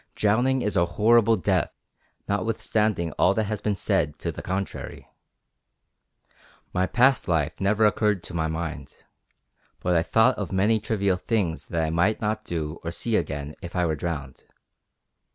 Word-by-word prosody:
Drowning 125 Hz, +5 st, +2 dB
is 105 Hz, -, -1 dB
a 85 Hz, -, +4 dB
horrible 115 Hz, +1 st, +5 dB
death, 90 Hz, -, 0 dB, 0.6 s
notwithstanding 105 Hz, -3 st, 0 dB
all 95 Hz, +2 st, +4 dB
that 110 Hz, -, +1 dB
has 105 Hz, 0 st, -3 dB
been 105 Hz, -1 st, 0 dB
said 85 Hz, -8 st, 0 dB
to -, -, -3 dB
the -, -, -8 dB
contrary. 95 Hz, +1 st, -5 dB, 1.7 s
My 90 Hz, +1 st, +1 dB
past 130 Hz, +5 st, +3 dB
life 80 Hz, -2 st, 0 dB
never 105 Hz, +3 st, +3 dB
occurred 105 Hz, -3 st, +2 dB
to -, -, -8 dB
my 80 Hz, -2 st, 0 dB
mind, 80 Hz, -3 st, -6 dB, 0.7 s
but 90 Hz, -, 0 dB
I 80 Hz, -, +4 dB
thought 110 Hz, +8 st, +3 dB
of 100 Hz, -5 st, -4 dB
many 105 Hz, +4 st, +2 dB
trivial 100 Hz, -4 st, 0 dB
things 90 Hz, -5 st, -1 dB
that 85 Hz, -1 st, -1 dB
I 80 Hz, -, -1 dB
might 85 Hz, +6 st, +2 dB
not 110 Hz, 0 st, -2 dB
do 80 Hz, -2 st, -4 dB
or 85 Hz, -, -3 dB
see 110 Hz, +6 st, -2 dB
again 70 Hz, -3 st, -2 dB
if 85 Hz, -1 st, -8 dB
I 90 Hz, -1 st, +2 dB
were 80 Hz, -2 st, 0 dB
drowned. 75 Hz, -4 st, -5 dB
95 Hz, 160 wpm, -25 LUFS, 85-110 Hz, 1.7 s, horrible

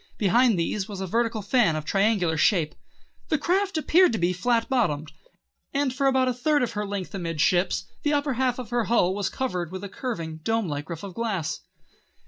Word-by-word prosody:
Behind 225 Hz, +2 st, +3 dB
these 190 Hz, +4 st, -2 dB
was 200 Hz, -2 st, -6 dB
a 190 Hz, -, -2 dB
vertical 230 Hz, +2 st, -1 dB
fan 210 Hz, -5 st, +3 dB
of 155 Hz, -1 st, -4 dB
triangular 195 Hz, -3 st, +2 dB
shape. 155 Hz, 0 st, +2 dB, 0.6 s
The 315 Hz, -, +2 dB
craft 375 Hz, +4 st, 0 dB
appeared 345 Hz, +2 st, +4 dB
to -, -, 0 dB
be 175 Hz, -1 st, +1 dB
flat 230 Hz, +5 st, +1 dB
bottomed, 160 Hz, -, 0 dB, 0.6 s
and 280 Hz, -2 st, +1 dB
for 275 Hz, +1 st, +1 dB
about 265 Hz, -1 st, +3 dB
a 255 Hz, -, +1 dB
third 290 Hz, +3 st, +1 dB
of 240 Hz, -, -1 dB
her 210 Hz, 0 st, -3 dB
length 195 Hz, -2 st, -5 dB
amidships 175 Hz, 0 st, +1 dB, 0.2 s
the 295 Hz, -, +1 dB
upper 285 Hz, -1 st, +1 dB
half 250 Hz, 0 st, 0 dB
of 245 Hz, -3 st, -7 dB
her 240 Hz, -2 st, +1 dB
hull 190 Hz, -5 st, +2 dB
was 200 Hz, -1 st, -1 dB
covered 180 Hz, -11 st, -3 dB
with 185 Hz, +1 st, -6 dB
a 200 Hz, -, -5 dB
curving, 165 Hz, -, -5 dB
domelike 160 Hz, -6 st, -2 dB
roof 165 Hz, 0 st, -6 dB
of 195 Hz, -2 st, -7 dB
glass. 195 Hz, -9 st, -2 dB
210 Hz, 195 wpm, -25 LUFS, 175-255 Hz, 0.6 s, appeared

